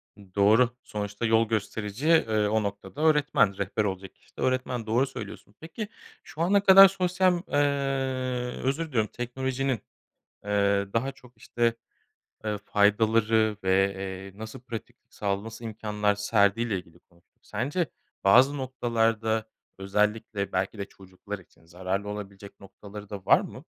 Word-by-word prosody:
I 95 -3 -18
doğru, 110 +5 +5
sonuçta 105 +2 -4
yol 115 0 +3
gösterici, 110 +3 -3
eee, 110 -10 +3
o 110 +1 +1
noktada 100 +8 -6
öğretmen, 150 -10 +3
rehber 100 +2 -1
olacak 95 -2 -4
kişi - - -29
de - - -6
öğretmen, 130 -2 -1
doğru 120 +5 +2
söylüyorsun. 110 -5 -9
Peki, 165 +7 -6 0.4
şu 160 - -8
ana 195 +4 +3
kadar 195 0 +10
sosyal 180 -1 +1
ııı, 135 -3 -1
özür 140 +5 0
diliyorum, 115 -7 0
teknolojinin, 130 +1 -2 0.7
eee, 100 -1 +1
daha 130 +4 0
çok, 125 -3 -20
işte, 115 +1 0 0.7
eee, 105 -1 -1
faydaları 110 +1 +3
ve, 95 +1 +3
eee, 95 +1 -7
nasıl 110 0 -7
pratik 120 -3 -8
sağla 100 -1 -2
nasıl 115 +1 -9
imkânlar 105 -2 -1
serdiğiyle 105 +1 +2
ilgili 85 -1 -12
konuştuk. 85 0 -31
Sence 140 - -2 0.4
bazı 130 +9 +6
noktalarda 115 -4 0 0.3
özellikle 105 +1 -1
belki 100 +3 -1
de 100 - -4
çocuklar 95 +2 -10
için 85 -2 -22
zararlı 95 +4 -3
olabilecek 100 -1 -8
noktaları 100 +1 -11
da 100 -3 -7
var - - +6
mı? - - -9
110 Hz, 140 wpm, -27 LUFS, 100-130 Hz, 0.7 s, kadar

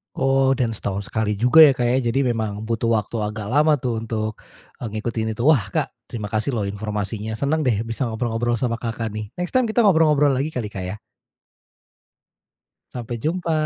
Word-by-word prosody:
Oh, 135 0 +3
dan 120 -3 0
setahun 100 -2 -4
sekali 105 -1 0
juga 125 +9 +4
ya, 145 -4 +9
Kak, 125 - -1
ya, 130 - +2
jadi 135 +4 +1
memang 110 -2 -3
butuh 115 +1 -1
waktu 115 0 0
agak 105 0 -4
lama 150 +3 +4
tuh, 120 -5 -2
untuk, 110 -1 -4 0.4
eee, 120 - -4
ngikutin 110 0 -3
itu. 115 - -3
Wah, 135 -9 +4
Kak, 100 - -2 0.2
terima 105 -3 -6
kasih 110 +5 -1
loh, 110 - -1
informasinya. 105 +1 -4
Senang 145 +4 0
deh, 110 -2 +1
bisa 115 +3 -3
ngobrol-ngobrol 115 +1 -1
sama 115 0 -2
Kakak 115 -2 -3
nih. 105 0 -5
Next 180 0 -4
time 255 -2 +2
kita 225 +1 +2
ngobrol-ngobrol 155 -6 +4
lagi 140 +4 -2
kali, 110 -4 -3
Kak, 95 - -5
ya? 95 - -4 2.0
Sampai 120 -1 -5
jumpa. 170 +2 -1
115 Hz, 185 wpm, -22 LUFS, 110-135 Hz, 2.0 s, ya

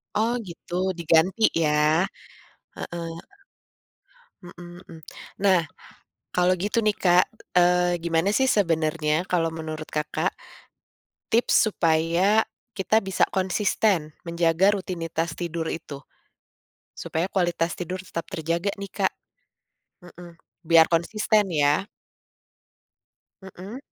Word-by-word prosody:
Oh, 225 +3 +1
gitu 170 0 -8 0.2
diganti 170 +5 +2 0.2
ya. 150 +3 +3 0.7
Heeh. 170 -1 -5 1.3
Mmm 175 0 -12
mmm. 165 -3 -13 0.4
Nah, 190 -3 +5 0.7
kalau 180 +1 +3
gitu 205 +5 0
nih, 210 - +2
Kak, 180 -1 +4 0.3
eee, 180 0 +3
gimana 165 +2 +1
sih 265 +4 +2
sebenarnya 160 -7 +1 0.2
kalau 165 -2 +1
menurut 155 -1 -6
Kakak, 150 0 -1 1.0
tips 235 +2 +2
supaya 170 +4 +2 0.3
kita 215 +3 +2
bisa 190 -1 +1
konsisten 190 -4 0
menjaga 170 +2 +2
rutinitas 165 -3 -4
tidur 170 -2 -4
itu? 150 -4 -6 1.0
Supaya 165 +3 -2
kualitas 175 -2 0
tidur 180 +1 -4
tetap 165 -2 -6
terjaga 170 +2 -2
nih, 200 - -6
Kak. - - 0 0.9
Mmm. 175 0 -13 0.3
Biar 165 0 +6
konsisten 205 +5 +1
ya. 145 +3 +2 1.6
Mmm. 190 +5 -9
175 Hz, 100 wpm, -24 LUFS, 165-190 Hz, 1.6 s, Biar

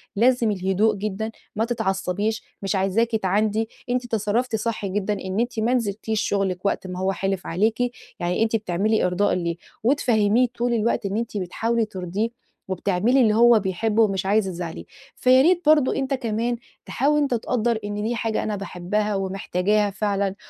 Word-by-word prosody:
لازم 235 +1 +3
الهدوء 195 +3 +1
جدًا، 210 +2 -3 0.2
ما 220 +2 +1
تتعصّبيش، 210 -2 -1 0.2
مش 195 0 -1
عايزاكِ 195 +5 +1
تعاندي. 215 +2 +1 0.2
أنتِ 250 0 0
تصرّفتِ 225 +2 0
صح 220 -1 -2
جدًا، 200 +1 -1
إن 190 0 -3
أنتِ 235 -1 -1
ما 230 +3 +1
نزلتيش 220 -2 -1
شُغلِك 195 -3 -1
وقت 190 - 0
ما 180 0 -5
هو 190 +1 +1
حلف 195 0 -2
عليكِ، 215 +6 +1 0.4
يعني 180 +4 0
أنتِ 225 0 0
بتعملي 210 +1 +1
إرضاء 180 +3 +1
ليه. 170 -2 -1 0.3
وتفهّميه 235 -2 +3
طول 240 0 0
الوقت 225 -1 0
إن 200 +1 -1
أنتِ 230 -2 -3
بتحاولي 225 +5 0
ترضيه، 195 +2 -3 0.4
وبتعملي 200 +7 +2
اللي 220 -3 +4
هو 235 0 +6
بيحبه، 210 +3 +1
ومش 195 -3 0
عايزة 200 -1 +2
تزعّليه. 170 -2 -6 0.3
فيا 255 +1 +5
ريت 350 +4 +4
برضه 300 -3 +4
أنت 270 0 -1
كمان 235 -1 -1 0.3
تحاول 295 +3 +1
أنت 280 -3 +1
تقدّر 235 0 0
إن 205 0 -3
دي 235 +2 -1
حاجة 225 -1 -1
أنا 215 - -2
باحبها، 200 +2 -2
ومحتاجاها 195 +1 0
فعلًا. 200 -1 -1
210 Hz, 165 wpm, -23 LUFS, 195-230 Hz, 0.4 s, هو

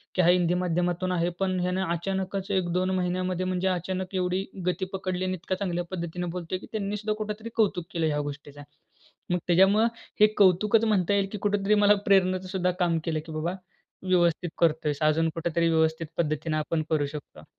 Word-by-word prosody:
की 185 - +4
हा 170 - +3
हिंदी 175 -1 +3
माध्यमातून 180 0 0
आहे 175 -1 +1
पण 185 -1 0
याने 180 +1 0
अचानकच 190 +3 -3
1-2 185 -1 0
महिन्यामध्ये 185 0 -1
म्हणजे 185 0 -1
अचानक 185 +1 -2
एवढी 185 +1 0 0.2
गती 180 +1 0
पकडली 185 -1 -2
आणि 185 - -1
इतका 185 +2 -3
चांगल्या 180 -2 -2
पद्धतीने 175 -1 -4
बोलतोय, 180 +1 -3
की - - -12
त्यांनी 210 -1 -2
सुद्धा 215 +1 -2
कुठेतरी 215 +2 -6
कौतुक 200 -6 +1
केलं 165 -2 +1
ह्या 150 -1 0
गोष्टीचा. 145 0 -10 0.7
मग 180 - +3
त्याच्यामुळं 195 +5 +5 0.3
हे 210 - +9
कौतुकच 205 +3 +4
म्हणता 205 -3 +2
येईल, 200 -1 +2
की 210 - -4
कुठेतरी 205 0 +1
मला 205 0 +5
प्रेरणेचं 185 -1 +3
सुद्धा 180 -1 0
काम 170 -2 +2
केलं. 160 -2 -1
की 160 - -9
बाबा 165 +4 -2 0.5
व्यवस्थित 175 -2 +2
करतोयस. 155 -3 +1
अजून 155 +1 +3
कुठेतरी 170 0 0
व्यवस्थित 160 0 +1
पद्धतीने 155 -1 -1
आपण 155 +1 -1
करू 155 -2 +2
शकतो. 145 +1 -10
180 Hz, 175 wpm, -27 LUFS, 170-190 Hz, 0.7 s, हे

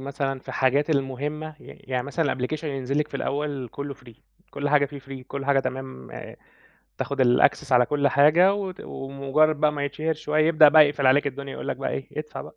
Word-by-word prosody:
مثلًا 135 0 -3
في - - -23
الحاجات 140 +4 +1
المهمة، 150 +2 -3
ي - - -16
يعني 130 -1 -5
مثلًا 140 0 -1
الapplication 135 +6 -4
ينزل 140 -1 -2
لِك 150 - 0
في - - -5
الأول 140 -2 -3
كُلّه 140 +2 -6
free 125 -4 -16 0.4
كل 145 0 -3
حاجة 145 -1 +3
في 140 0 -10
free 135 -1 -10
كل 140 0 -6
حاجة 140 -1 +3
تمام 130 - -6 0.9
تاخد 140 -1 -1
الaccess 130 +2 +3
على 125 -1 +5
كل 145 -1 +1
حاجة 155 +8 +5
وت 195 -3 -5
ومُجرّد 140 +3 0
بقى 150 +1 +2
ما 145 -1 -3
يتشهر 155 +3 -2
شوي 155 0 -1
يبدأ 155 -1 +6
بقى 155 0 +7
يقفل 145 -2 -1
عليك 145 +3 +4
الدنيا 140 0 -5
يقول - - -7
لك - - -2
بقى 135 - -3
إيه 135 - -5
ادفع 150 0 -6
بقى. - - -12
140 Hz, 205 wpm, -24 LUFS, 135-150 Hz, 0.9 s, بقى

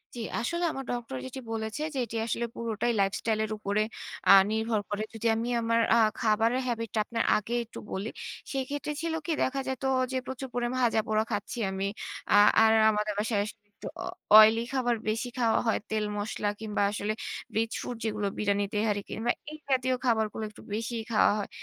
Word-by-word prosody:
জি, - - -6 0.2
আসলে 340 +9 -1
আমার 270 - -5
ডক্টর 240 - -4
যেটি 130 - -6
বলেছে 220 +4 -3
যে, - - -4
এটি 230 - -8
আসলে 235 +1 -1
পুরোটাই 230 0 -1
lifestyle 215 +3 0
এর 215 - -7
উপরে 205 0 0 0.5
আ - - +11 0.2
নির্ভর 220 0 0
করে। 210 +1 -2
যদি 225 +1 -2
আমি 230 +2 -2
আমার 230 0 +2 0.2
আ - - +5 0.2
খাবারের 230 +2 +2
habit 230 -2 -2
টা - - +2
আপনার 230 0 -1
আগে 215 +3 -4
একটু 230 - -10
বলি, 200 +4 -3 0.4
সেক্ষেত্রে 280 +2 -3
ছিল 330 -1 -2
কি 340 - -1
দেখা 270 +1 -1
যেত 265 0 -3 0.3
যে, 260 - 0
প্রচুর 265 0 -5
করে 240 -1 0
ভাজা 235 -3 +3
পোড়া 215 0 +2
খাচ্ছি 205 +3 -3
আমি। 190 +1 -2 0.5
আ - - +7 0.3
আর 220 - +6 0.2
আমাদের 210 0 0
বাসায় 215 -1 +1
একটু 205 -1 -12 0.2
অ - - -4 0.3
oily 220 +1 +7
খাবার 245 -3 +1
বেশি 225 +3 -1
খাওয়া 230 -3 +3
হয়। 225 - +2
তেল 215 -1 0
মসলা 205 0 -2
কিংবা 210 -2 -1
আসলে 205 +1 -2 0.4
rich 225 0 0
food 245 - -4
যেগুলো 210 -2 -1
বিরিয়ানি, 205 -1 +1
তেহারি 210 -1 +1
কিংবা 235 +2 0 0.2
এই 310 - -8
জাতীয় 260 -1 +2
খাবারগুলো 220 -2 +1
একটু 215 - -15
বেশিই 230 +1 -3
খাওয়া 220 - +5
হয়। 205 - -4
225 Hz, 185 wpm, -28 LUFS, 210-240 Hz, 0.5 s, আ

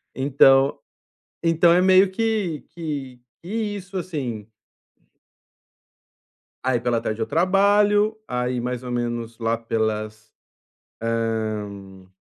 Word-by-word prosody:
Então 135 0 +4 0.7
então 165 0 +4
é 175 - +4
meio 190 +1 +5
que 210 -7 -1
que 140 -7 -5 0.2
que 170 - -11
isso, 205 -4 -4
assim. 135 - -4 2.2
Aí 130 -1 +1
pela 120 -1 0
tarde 110 +1 -3
eu - - +1
trabalho, 205 +4 +3
aí 125 0 -2
mais 125 +1 -3
ou 125 - -6
menos 120 -1 -3
lá 115 0 0
pelas, 110 -1 -3 0.7
hã, 110 -4 -3
125 Hz, 105 wpm, -23 LUFS, 115-180 Hz, 2.2 s, meio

